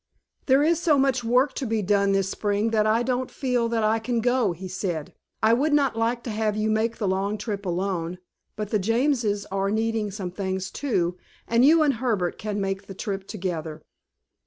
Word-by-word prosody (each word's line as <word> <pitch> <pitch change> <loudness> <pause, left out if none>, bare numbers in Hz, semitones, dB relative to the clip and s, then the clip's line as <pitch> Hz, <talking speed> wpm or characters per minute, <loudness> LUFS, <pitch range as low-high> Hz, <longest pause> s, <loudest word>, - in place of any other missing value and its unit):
"There 270 +1 +5
is 330 +1 +3
so 310 -4 +4
much 265 -2 +2
work 250 +4 +3
to 265 - -3
be 220 -1 0
done 200 0 +2
this 195 -1 +1
spring 205 +2 -1
that 215 -1 +2
I 225 +2 +3
don't 255 0 -1
feel 250 -4 0
that 230 -1 0
I 220 +1 +2
can 235 +1 -1
go," 245 -3 +2
he 180 +3 -7
said. 175 -4 -4 0.3
"I 220 +1 +5
would 290 +5 +2
not 280 -5 +3
like 230 +1 0
to 230 - -4
have 215 -1 -1
you 215 0 +1
make 225 +1 0
the 200 0 0
trip 205 -2 -4
alone, 180 -1 -2 0.4
but 210 -1 -5
the 215 - +2
Jameses 225 -1 +1
are 195 0 0
needing 220 0 0
some 190 -3 -5
things, 190 0 -3
too, 180 -10 -1 0.3
and 235 +1 +3
you 315 +3 +6
and 290 -2 +3
Herbert 220 -8 -1
can 210 -1 -3
make 195 0 -3
the 195 - -8
trip 195 -1 -4
together." 170 -6 -4
215 Hz, 200 wpm, -25 LUFS, 195-240 Hz, 0.4 s, you